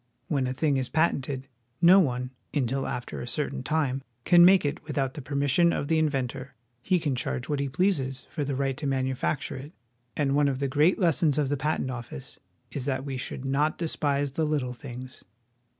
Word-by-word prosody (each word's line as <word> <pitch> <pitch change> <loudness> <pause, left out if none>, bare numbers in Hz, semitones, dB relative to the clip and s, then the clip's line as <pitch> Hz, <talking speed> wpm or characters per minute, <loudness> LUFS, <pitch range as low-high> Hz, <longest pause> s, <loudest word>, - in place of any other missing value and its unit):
When 135 -4 +1
a 130 - -2
thing 145 -1 +1
is 130 -1 -2
patented, 140 -4 0 0.3
no 180 +3 +8
one, 125 -6 0 0.2
until 135 -1 0
after 125 - -5
a - - -6
certain 140 +3 -3
time, 135 -2 0 0.2
can 175 -1 +7
make 185 -1 +6
it 145 - -2
without 135 -4 -2
the 150 - -7
permis 140 +1 -1
sion 170 +4 +5
of 145 - -2
the 160 -1 +3
inventor. 135 -3 -2 0.3
He 180 +8 +2
can 150 -4 -1
charge 125 +1 -2
what 145 -2 -1
he 140 -1 -1
pleases 135 -5 0
for 155 - -2
the 140 -1 -2
right 135 0 0
to 145 - -3
manufacture 130 +1 -1
it; 145 +5 -9 0.4
and 140 -2 +1
one 145 0 +4
of 135 -2 0
the 140 +1 -1
great 150 +7 +3
lessons 165 -5 +3
of 145 -3 +1
the 145 - +1
Patent 140 -2 -1
Office 120 - -8 0.3
is 130 - -4
that 135 -1 -1
we 135 -2 -3
should 125 +1 -4
not 145 +3 +1
despise 145 -4 0
the 160 +4 -1
little 145 -5 -1
things. 125 +1 -9
140 Hz, 200 wpm, -27 LUFS, 130-150 Hz, 0.4 s, no